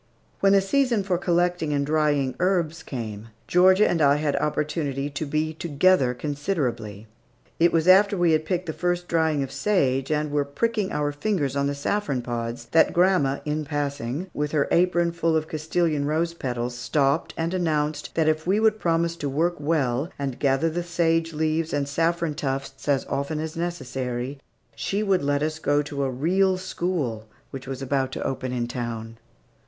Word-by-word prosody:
When 195 0 +4
the 195 - +5
season 235 +1 +1
for 185 -3 0
collecting 175 -3 +1
and 140 -1 0
drying 145 -3 +1
herbs 175 -3 0
came, 110 -7 -6 0.2
Georgia 185 - +5
and 165 - 0
I 140 -1 +5
had 150 -1 0
opportunity 145 -2 -1
to 140 +2 -4
be 155 +2 -1
together 155 -4 +2
considerably. 135 - -3 0.5
It 170 +1 +5
was 165 0 +1
after 200 +2 +6
we 175 -2 +3
had 155 0 +2
picked 180 +3 -2
the 160 - -4
first 175 +1 -1
drying 160 -4 +1
of 135 - -6
sage 135 -10 +1
and 150 -1 0
were 145 -1 +1
pricking 210 +8 -1
our 145 0 0
fingers 145 -3 -1
on 140 0 +1
the 140 - -2
saffron 140 -3 -1
pods, 120 0 -4
that 160 - +4
grandma, 175 -7 +2
in 150 +1 -1
passing, 145 0 -3
with 150 +1 -2
her 145 -2 +2
apron 175 -1 +3
full 165 -1 0
of 155 0 -2
Castilian 155 -1 0
rose 160 +3 0
petals, 125 -5 -3
stopped 140 +4 0
and 165 +2 -1
announced 155 -4 -1
that 160 -1 +2
if 155 +1 0
we 195 +3 +3
would 220 -1 +3
promise 170 -1 +1
to 145 - -3
work 170 +5 0
well, 145 -2 0
and 135 -3 -4
gather 140 +3 +2
the 175 +2 -2
sage 165 -1 +1
leaves 160 +1 -1
and 145 -1 0
saffron 165 +2 0
tufts 135 -2 -4
as 140 -2 +2
often 140 +2 -2
as 155 0 -4
necessary, 135 -5 -4 0.4
she 200 +2 -1
would 195 -3 +2
let 145 +1 +1
us 155 +1 -2
go 145 -1 +2
to 140 -1 -3
a 135 - 0
"real 185 +9 +2
school" 170 -12 -3 0.2
which 135 -1 -8
was 135 0 -5
about 135 0 0
to - - -4
open 130 -1 -3
in 120 -1 -2
town. 115 -2 -5
155 Hz, 180 wpm, -25 LUFS, 140-170 Hz, 0.5 s, after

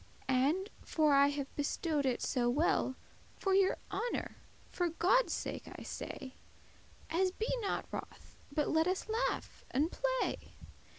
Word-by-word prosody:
And, 295 +10 +2
for 305 -2 +3
I 280 0 +7
have 285 -1 -3
bestowed 290 0 0
it 250 - 0
so 245 -3 +1
well, 265 -1 +2 0.4
For 390 - 0
your 385 0 +4
honour, 430 +5 -2 0.3
for 355 -1 0
Godde's 375 +9 +3
sake - - -3
I - - -8
say, 260 -1 -6 0.8
As 370 +3 +3
be 435 +6 -2
not 400 - -1
wroth, - - -7 0.2
but 295 0 +1
let 320 +1 +3
us 370 +3 -1
laugh 445 +2 -1
and 300 +5 +1
play. - - -1
325 Hz, 140 wpm, -34 LUFS, 280-385 Hz, 0.8 s, I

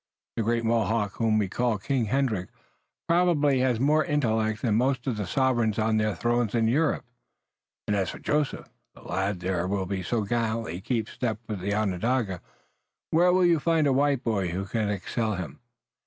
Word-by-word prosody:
The - - -1
great 115 +1 0
Mohawk 115 -2 0
whom 110 -2 +2
we 105 -2 +1
call 120 +3 0
King 125 +4 -1
Hendrick 110 -6 0 0.6
probably 165 -6 +3
has 125 -3 +1
more 150 +4 +3
intellect 110 -8 0
than 115 -4 +2
most 125 +2 +1
of 130 - -1
the 105 -3 -4
sovereigns 120 -2 +1
on 110 0 +2
their 110 -1 0
thrones 120 -2 0
in 115 -1 +2
Europe. 145 +6 +1 0.8
And 105 - +1
as 95 -2 0
for - - -7
Joseph, 150 -1 -1 0.3
the - - -15
lad 95 -1 -2
there 90 -1 -1
who 95 -1 -2
so 110 +4 -1
gallantly 110 -4 -2
keeps 115 -1 -2
step 115 -4 -2
with 105 -3 -4
the 100 +3 -1
Onondaga, 105 -1 0 0.7
where 175 +3 +4
will 185 0 +4
you 170 -2 +4
find 165 0 +2
a 140 - +3
white 140 -1 +2
boy 100 -5 0
who 90 +3 -3
can 105 +1 -1
excel 105 +2 -2
him? 85 -7 -6
115 Hz, 180 wpm, -26 LUFS, 100-130 Hz, 0.8 s, where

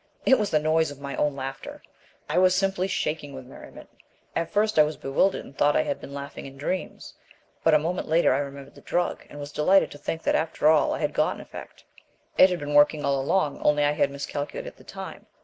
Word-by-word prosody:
It 265 - +5
was 210 -2 0
the 155 - +3
noise 155 +1 +2
of 145 -1 -10
my 140 0 -5
own 145 -2 +1
laughter! 135 0 -7 0.4
I - - +1
was 185 0 +4
simply 195 -1 0
shaking 150 -6 -3
with 130 -1 -9
merriment. 130 - -13 0.5
At 165 - -1
first 210 -3 +1
I - - +9
was 150 +1 -3
bewildered 140 +8 0
and 135 - -14
thought 145 +1 +3
I 155 - +3
had 145 -2 -3
been - - -9
laughing 140 0 -7
in 135 0 -12
dreams, 180 +7 -4 0.5
but 160 -1 +5
a - - +8
moment 165 +4 -2
later 160 -3 +3
I 135 - +1
remembered 140 -1 -7
the - - -15
drug, 175 0 -1
and 145 - -10
was 145 0 -7
delighted 185 +7 +3
to 145 - -11
think 160 +2 -4
that - - +1
after 160 -1 +1
all 155 -1 +4
I - - -6
had - - -1
got - - +1
an - - -10
effect. - - -11 0.5
It 185 - +7
had 180 - -1
been 145 -2 -5
working 145 +1 +4
all 140 -1 +1
along, 150 +1 0
only 150 0 +3
I 145 - +3
had 150 - +1
miscalculated 145 - -5
the - - -18
time. - - -9
150 Hz, 235 wpm, -25 LUFS, 140-175 Hz, 0.5 s, I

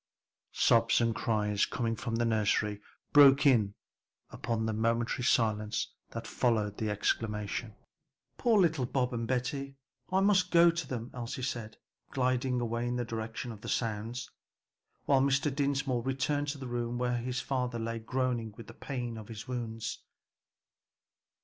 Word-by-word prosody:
Sobs 115 0 +4
and 115 -1 +2
cries 105 -3 +1
coming 115 -2 -1
from 115 +1 -3
the 120 +1 +1
nursery 105 -2 +1 0.3
broke 140 -1 +8
in 110 -7 +4 0.6
upon 115 -1 -2
the 110 - -1
momentary 115 +3 0
silence 110 -3 +1 0.2
that 115 0 -6
followed 110 -2 0
the 110 - -1
exclamation. 105 +1 -2 0.6
"Poor 230 -3 +3
little 160 -8 +2
Bob 125 -1 0
and 115 -1 -2
Betty, 135 +2 -2 0.4
I 190 +1 +3
must 195 -2 +4
go 170 0 +6
to 165 -4 -4
them," 120 -2 -5
Elsie 125 +1 -5
said, 115 -4 -4 0.3
gliding 130 -1 0
away 120 0 -1
in 120 - -1
the 120 -1 -1
direction 115 +1 -4
of 105 -2 -10
the - - -6
sounds, 115 +1 -2 0.7
while 135 -2 +4
Mr. 140 +1 +2
Dinsmore 140 -3 0
returned 135 +3 -1
to 145 0 -3
the 135 - -7
room 120 0 -2
where 125 0 0
his 125 +2 -2
father 125 -2 -2
lay 115 0 -3
groaning 120 -2 -2
with 115 - -9
the - - -11
pain 120 -4 -5
of 105 - -10
his 110 -2 -8
wounds. 115 -3 -4
120 Hz, 155 wpm, -31 LUFS, 115-130 Hz, 0.7 s, broke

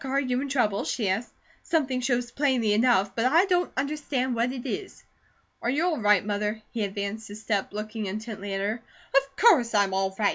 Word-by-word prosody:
Are 270 +1 0
you 255 -2 0
in 280 - -4
trouble?" 220 -7 +1
she 215 -6 -1
asked. 220 +6 -1 0.3
"Something 265 -6 0
shows 245 -1 0
plainly 255 -7 +2
enough, 210 -4 +3
but 230 - 0
I 325 +9 +5
don't 360 -2 +1
understand 275 -2 -1
what 235 +1 0
it 255 -1 -6
is." 380 - -5 0.6
"Are 235 - -1
you 295 +7 +1
all 335 -5 0
right, 210 -2 +4
Mother?" 210 +1 -1
He 225 - -2
advanced 200 +2 -4
a 205 - -8
step, 210 -2 -2
looking 215 +1 -4
intently 205 0 -5
at 195 - -2
her. 215 +4 -2 0.3
"Of 275 0 +2
course 270 - +5
I'm 200 -2 +3
all 190 0 0
right! 210 -2 +3
235 Hz, 205 wpm, -26 LUFS, 205-270 Hz, 0.6 s, I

